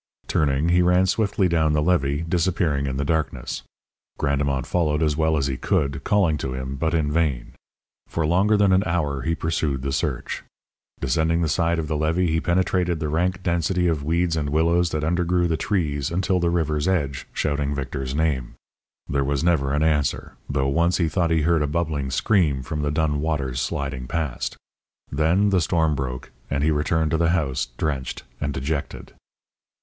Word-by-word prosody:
Turning, 75 +2 +1
he 90 +1 +4
ran 90 +1 +4
swiftly 100 -1 +1
down 80 -3 +2
the 75 - +2
levee, 75 -3 +1
disappearing 85 -5 +1
in 65 -1 -2
the 70 - -1
darkness. 80 +1 -2 0.6
Grandemont 70 -2 0
followed 80 -3 +1
as 75 -2 +1
well 80 0 +2
as 70 - 0
he 65 -2 -2
could, 70 +3 0
calling 90 -7 +2
to 65 -1 -3
him, 65 +1 -4
but 80 +4 0
in 75 -3 +1
vain. 75 -6 0 0.6
For 80 - -1
longer 95 +7 +3
than 100 -1 +4
an 95 - +4
hour 75 -5 -1
he 80 +6 0
pursued 80 -5 -1
the 70 - -2
search. 65 - -2 0.6
Descending 80 +6 +1
the - - +1
side 85 +2 +1
of 80 -2 -2
the 75 - -1
levee, 80 +3 +1
he 80 0 +1
penetrated 90 -1 +1
the 75 - -2
rank 90 +4 0
density 90 +1 +1
of 80 -4 0
weeds 85 +2 +1
and 75 -3 -1
willows 85 +3 +2
that 75 -2 -2
undergrew 85 +2 +1
the 80 - 0
trees 75 -7 -1
until 90 +1 0
the 85 -1 +1
river's 80 -2 0
edge, 70 -8 -1
shouting 70 -1 -1
Victor's 65 -1 -4
name. 75 -6 -1 0.5
There 70 -1 0
was 70 +2 -1
never 80 -6 +2
an 75 +2 +1
answer, 75 -4 0 0.2
though 70 -1 0
once 85 +5 +2
he 85 -3 +1
thought 85 +1 +1
he 80 -1 +2
heard 85 0 +3
a 75 - +1
bubbling 75 -3 -1
scream 75 - +1
from 75 +2 -3
the 75 - 0
dun 75 -1 0
waters 70 -5 -1
sliding 65 -2 -3
past. 80 -4 -3 0.5
Then 80 +8 +2
the 95 -2 +3
storm 80 -2 +1
broke, 65 -3 -4 0.2
and 70 0 0
he 80 - +3
returned 80 +1 +1
to 80 - +2
the 85 0 +2
house 65 -7 0
drenched 70 -5 -3 0.2
and 75 0 -1
dejected. 70 +2 -4
80 Hz, 185 wpm, -23 LUFS, 70-85 Hz, 0.6 s, he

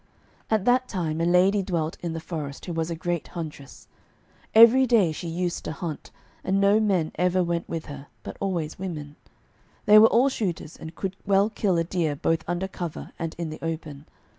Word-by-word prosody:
At 215 -3 +1
that 250 +1 +3
time 165 -6 -2
a - - +2
lady 185 +3 +4
dwelt 170 -4 -2
in 170 -2 -3
the 165 - -4
forest, 155 -4 -6
who 175 - -4
was 165 0 -2
a 170 - -3
great 175 0 -3
huntress. 150 -5 -8 0.7
Every 235 +4 +8
day 215 -9 +4
she 165 +2 -6
used 175 +1 -2
to - - -3
hunt, 160 -3 -6 0.3
and 190 +1 +1
no 200 +2 +4
men 190 -7 +1
ever 180 +1 +2
went 170 -1 -2
with 165 -1 -4
her, 145 -1 -9 0.2
but - - -7
always 175 -6 -3
women. 150 -6 -6 0.7
They 210 -1 +8
were 220 - +8
all 250 +5 +4
shooters, 180 - -3
and 160 +1 -10
could 190 -1 -4
well 200 +2 +3
kill 195 -5 0
a 165 - +2
deer 165 -3 -1
both 165 +3 0
under 175 +2 -2
cover 175 -4 -6
and 165 -2 -4
in 165 -2 -4
the 155 - -9
open. 155 -3 -5
175 Hz, 195 wpm, -25 LUFS, 160-195 Hz, 0.7 s, Every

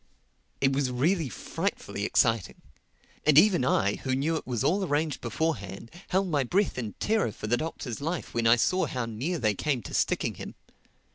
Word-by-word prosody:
It 135 0 +3
was 135 -1 +1
really 150 +5 +1
frightfully - - -3
exciting. 115 -4 +1 0.6
And 150 -1 +4
even 180 -4 +6
I, 100 -5 +2
who 130 -1 -2
knew 150 +5 0
it 160 - -5
was 120 -4 -1
all 195 +5 +2
arranged 150 -3 -1
beforehand, 115 - -3 0.2
held 190 +1 +1
my 145 -5 +1
breath 185 - 0
in 110 -5 -4
terror 215 - 0
for 105 - -8
the 115 +3 +2
Doctor's 130 -3 -5
life 165 +4 -3
when 115 -1 +1
I 115 - +7
saw 185 +8 +1
how 125 -3 -3
near 125 +11 -3
they 110 -7 +1
came 130 +2 -1
to - - -8
sticking - - +1
him. - - -9
135 Hz, 185 wpm, -28 LUFS, 115-165 Hz, 0.6 s, I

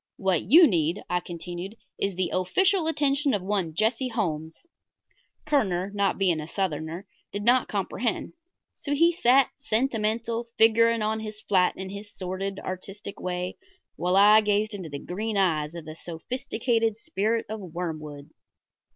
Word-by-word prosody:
"What 190 -5 +1
you 320 - +7
need," 170 - +1
I 180 - +2
continued, 175 +3 -7 0.2
"is 195 -2 -1
the 185 -1 -1
official 360 - +2
attention 290 -4 +1
of 195 - -3
one 190 -5 -1
Jesse 225 +6 +1
Holmes." 165 - -3 0.8
Kerner, 200 -11 +1
not 200 -2 +1
being 180 -5 +2
a 150 - -7
Southerner, 165 0 -3 0.3
did 205 +1 -4
not 245 +2 +4
comprehend, 210 +3 -2 0.4
so 285 0 -3
he 335 +4 +5
sat, 270 -5 +4
sentimental, 230 -3 -1
figuring 230 0 +4
on 220 +1 0
his 215 -1 -6
flat 185 -4 +2
in 190 0 -6
his 200 +1 -8
sordid, 190 +1 -4
artistic 195 +2 -7
way, 180 0 -3 0.4
while 180 +2 0
I 210 +2 +7
gazed 210 +1 +1
into 185 -5 -6
the 140 - -5
green 210 +7 -3
eyes 160 -4 +1
of 170 -2 -7
the 155 - -7
sophisticated 225 +5 -2
Spirit 225 +1 -1
of 220 +1 -5
Wormwood. 155 -5 -6
200 Hz, 150 wpm, -26 LUFS, 180-230 Hz, 0.8 s, you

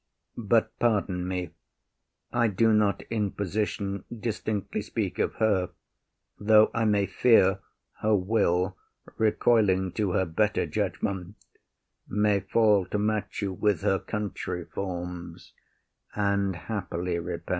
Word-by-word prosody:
But 115 0 +2
pardon 100 -6 +1
me: 90 -1 -3 0.8
I 120 -1 +3
do 110 +2 +3
not 105 -1 +2
in 105 -3 0
position 100 0 -2
Distinctly 110 -3 -3
speak - - -3
of - - 0
her, 100 -5 +1 0.7
though 110 +1 +5
I 115 -1 +1
may 105 -2 +3
fear 95 -1 +4 0.4
Her 110 0 +2
will, 95 -2 +1 0.4
recoiling 105 -4 +3
to 100 -2 -1
her 95 - +2
better 105 +6 +1
judgement, 95 0 -3 0.7
May 105 0 +2
fall 100 -1 +3
to 105 - -2
match 105 0 -1
you 95 -1 -1
with 100 -2 +1
her 95 -2 +2
country 95 -4 -4
forms, 90 -2 -6 0.6
And 100 -2 +1
happily 90 -2 -3
repent. 85 0 -6
100 Hz, 120 wpm, -27 LUFS, 90-110 Hz, 0.8 s, though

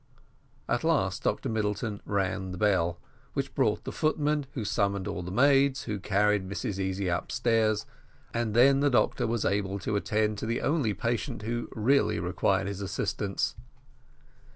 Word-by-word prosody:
At - - 0
last - - +1
Dr - - -1
Middleton 105 -1 -2
rang 95 -1 -1
the - - -6
bell, 90 -4 +1 0.3
which - - -3
brought - - +1
the - - -5
footman, 150 -2 0
who 115 -6 -3
summoned 100 -1 0
all 100 -3 -3
the 90 - -6
maids, 135 +5 +3
who 105 -1 -3
carried 100 0 +1
Mrs 100 0 -3
Easy 95 0 -1
upstairs, 110 +4 +1 0.5
and 115 -2 -1
then 135 +3 +6
the 145 +1 +3
doctor 125 - +2
was 115 -2 -1
able 100 0 0
to 100 +3 -2
attend 105 0 0
to - - -4
the 115 +1 -1
only 140 -9 +1
patient 120 0 -2
who 120 +2 -3
really 135 +6 +2
required - - +1
his 100 0 -4
assistance. 100 +1 -2
105 Hz, 155 wpm, -28 LUFS, 100-120 Hz, 0.5 s, then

